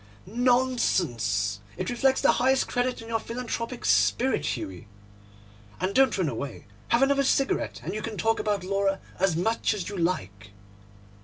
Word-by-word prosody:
'Nonsense! 180 - +1 0.2
It - - -2
reflects 265 +2 +2
the - - +5
highest 265 +2 +2
credit 245 -1 -1
on - - -11
your 225 0 0
philanthropic 235 +1 -5
spirit, 260 +2 +2
Hughie. 95 -1 -7 0.9
And 185 +2 -1
don't 265 -1 +4
run 185 -4 +1
away. 135 0 -5 0.2
Have 235 +3 +3
another 275 0 +3
cigarette, 275 0 0
and 180 - -4
you 215 - -3
can 215 -1 -5
talk 225 0 +1
about 205 -3 -1
Laura 195 +1 0 0.2
as 190 -3 +2
much 220 +5 +1
as 195 -3 -4
you 205 - -6
like. 100 - -2
210 Hz, 155 wpm, -26 LUFS, 170-245 Hz, 0.9 s, the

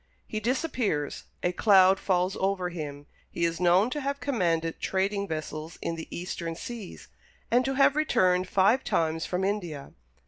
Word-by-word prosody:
He 215 - -4
disappears; 230 - -1 0.2
a 175 - +2
cloud 190 0 +5
falls 185 0 +1
over 190 -2 0
him. 145 -4 -6 0.2
He 170 - -1
is 165 0 -1
known 180 +6 +4
to 295 - -2
have 280 +1 -2
commanded 170 -11 0
trading 200 +1 0
vessels 155 0 -5
in 170 - -3
the 165 -1 -7
Eastern 170 -1 -5
seas, 225 +1 -8 0.4
and 245 +2 +4
to 270 0 -1
have 275 +1 +4
returned 185 -11 +2
five 200 +7 +3
times 160 0 0
from 180 +1 -1
India. 175 -8 -3
185 Hz, 160 wpm, -27 LUFS, 165-215 Hz, 0.4 s, cloud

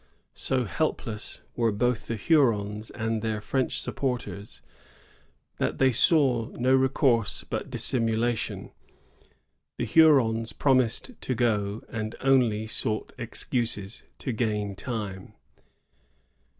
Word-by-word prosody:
So 130 -1 -1
helpless 115 -4 -3
were 115 -2 +2
both 120 +2 -1
the 115 - -2
Hurons 110 -5 +1
and 110 -1 -2
their 110 -1 -2
French 130 +5 -1
supporters, 125 -6 -4 0.9
that - - -1
they 135 -1 +4
saw 130 -4 +3
no 130 +2 +2
recourse 130 -4 +2
but - - -5
dissimulation. 115 -1 0 1.1
The 120 - -1
Hurons 115 -5 +4
promised 130 - +1
to 130 - -2
gOy 105 -3 0
and 110 -1 -5
only 125 -5 +2
sought 110 0 -1
excuses 115 -3 0 0.2
to 130 - -4
gain 105 -3 -1
time. 105 -6 -6
115 Hz, 105 wpm, -27 LUFS, 110-130 Hz, 1.1 s, they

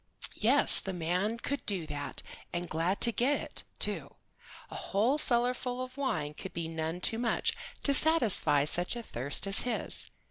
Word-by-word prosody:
Yes, - - +6
the 190 - -5
man 180 +6 -2
could 275 +3 -5
do 190 -6 -1
that, 145 -2 -5 0.3
and 175 0 -4
glad 170 +5 -2
to 235 - +6
get 260 +5 0
it, - - -4 0.2
too. - - -3 0.6
A - - -8
whole 230 +9 0
cellar 245 -2 +3
full 250 0 -5
of 255 0 -6
wine 260 - -3
would 190 - -8
be 165 -1 -3
none 160 +2 -5
too 225 - +3
much 235 -2 0 0.3
to 280 - +3
satisfy 235 - +4
such 175 +7 -1
a 235 - -6
thirst 140 - -2
as 195 +1 0
his. 245 - 0
200 Hz, 175 wpm, -30 LUFS, 165-245 Hz, 0.6 s, Yes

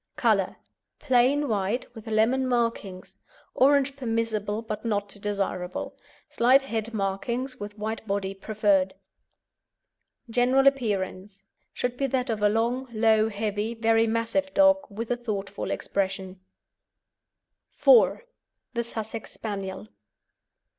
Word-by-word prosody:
COLOUR - - +2 0.4
Plain 270 +2 +2
white 210 +2 -1
with 225 -2 -11
lemon 225 +5 +2
markings; 230 -6 -2 0.3
orange 275 0 +3
permissible 225 -4 -2
but 215 -2 -5
not 205 -3 -1
desirable; 195 -3 -3 0.3
slight 255 +3 +4
head 230 -3 -3
markings 235 +6 -2
with 205 +1 -7
white 220 +1 -4
body 195 -1 -1
preferred. 195 -2 +1 1.3
GENERAL 250 +3 +3
APPEARANCE 200 -7 0 0.3
Should 245 0 -3
be 275 - 0
that 255 -1 -1
of 215 -2 -3
a 205 - +4
long, 235 +4 0
low, 220 -1 +3
heavy, 210 +1 -2
very 225 0 +3
massive 230 +6 0
dog, 290 0 +6
with 225 +3 -5
a - - +3
thoughtful 205 -4 -4
expression. 190 -1 -3 1.4
IV. - - +5 0.5
THE 235 -1 -1
SUSSEX 225 -1 -6
SPANIEL. 195 -2 -5
225 Hz, 115 wpm, -26 LUFS, 205-245 Hz, 1.4 s, dog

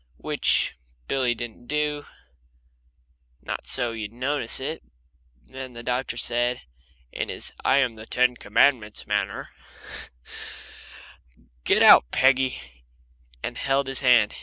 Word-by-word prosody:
Which - - +1 0.3
Billy 130 -3 +1
didn't 120 +1 -8
do, 150 -1 -2 1.3
not - - -6
so 120 -3 +3
you'd 110 -2 -6
notice 130 +1 -1
it. 140 +5 -4 0.6
Then 130 - -9
the 120 0 -9
doctor 125 -1 -2
said, 120 +1 0 0.5
in - - -4
his - - 0
I 135 - +4
am 130 -4 +2
the 110 0 -12
Ten 125 0 +2
Commandments 110 0 +1
manner, - - -2 2.2
"Get - - +4
out, - - +8
Peggy," 130 - +2 0.8
and 120 - -4
held 140 0 +1
his 135 -1 -3
hand. 120 -5 +4
125 Hz, 115 wpm, -24 LUFS, 120-135 Hz, 2.2 s, out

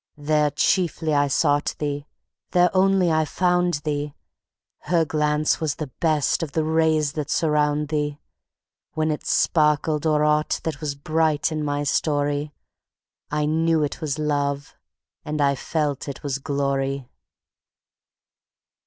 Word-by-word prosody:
There 150 0 +2
chiefly 160 +1 +1
I 145 0 +3
sought 145 +1 +1
thee, 145 -1 -3 0.5
there 180 +1 +3
only 190 -2 +3
I 160 0 +3
found 175 +2 +1
thee; 145 -1 -3 0.6
Her 170 -2 +1
glance 150 0 +1
was 155 -3 -1
the 150 -4 -6
best 155 -4 +1
of 155 -4 -4
the 160 - +1
rays 155 -2 +2
that 150 -2 -4
surround 150 -1 +1
thee; 150 -1 -2 0.7
When 155 0 0
it 150 - -5
sparkled 150 0 +2
o'er 150 -1 +2
aught 150 0 +1
that 155 -2 -4
was 145 -2 -3
bright 155 +2 0
in 155 -1 -2
my 145 0 -1
story, 145 0 0 0.8
I 150 0 0
knew 160 +1 +2
it 145 - -4
was 150 -2 -2
love, 145 -2 -1 0.5
and 150 0 -4
I 140 -1 +3
felt 145 0 -2
it 140 - -8
was 140 -1 -2
glory. 140 -2 -2
150 Hz, 135 wpm, -23 LUFS, 145-160 Hz, 0.8 s, I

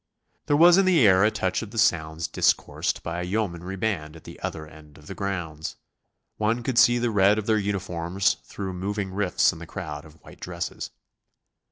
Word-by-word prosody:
There 145 -1 +3
was 175 +3 +7
in 195 - +3
the 170 -10 +5
air 95 -1 +6
a 105 - +5
touch 95 -3 -1
of 110 - -7
the 115 - -10
sounds 80 -4 +1
discoursed - - 0
by 85 +1 -3
a - - -3
yeomanry 90 -2 -3
band 90 -7 -2
at 80 - -13
the - - -11
other 80 - -5
end 75 -1 -16
of 75 - -17
the 95 - -7
grounds. 85 -6 -4 0.6
One 110 +3 0
could 120 -1 +1
see 120 +1 +6
the 120 -1 0
red 100 0 +4
of 110 - -2
their 110 -1 +2
uniforms 95 -2 -1
through 95 -2 -6
moving 95 +1 -3
rifts 95 -3 +2
in 80 - -11
the 85 - -9
crowd 75 -7 -6
of 80 0 -16
white - - -14
dresses. - - -5
95 Hz, 200 wpm, -25 LUFS, 85-110 Hz, 0.6 s, was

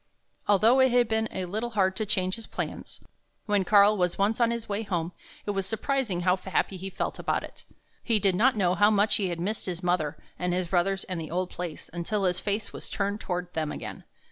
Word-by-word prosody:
Although 220 +6 +5
it 260 0 +6
had 245 -1 +4
been 220 0 0
a 185 - -3
little 215 +6 -3
hard 190 -1 +3
to 215 - -2
change 185 -1 +1
his 230 0 -4
plans, - - -5 0.4
when 205 -2 +2
Karl 205 +2 +6
was 180 -3 0
once 210 +4 +1
on 235 - +5
his 235 -1 -3
way 205 +1 -2
home 175 -5 -2 0.3
it 205 - 0
was 195 -1 -2
surprising 225 -4 -1
how 180 +1 +3
happy 190 +1 -1
he 190 +1 -5
felt 190 - -3
about - - 0
it. - - -11 0.4
He 230 -3 +1
did 195 -2 +3
not 225 +6 +3
know 180 -3 +3
how 205 +4 +5
much 210 0 +3
he 195 -3 0
had 170 -1 -4
missed 205 +5 -2
his 180 0 -4
mother 175 -4 0 0.2
and 180 0 0
his 180 0 0
brothers 190 +2 +1
and 180 -3 -4
the 155 - -6
old 180 +2 -2
place, 175 -3 -6
until 195 +4 -1
his 180 -1 +1
face 205 +1 -2
was - - -7
turned 205 +1 -1
toward 180 -2 -4
them 155 -2 -1
again. - - -7
195 Hz, 225 wpm, -27 LUFS, 180-215 Hz, 0.4 s, it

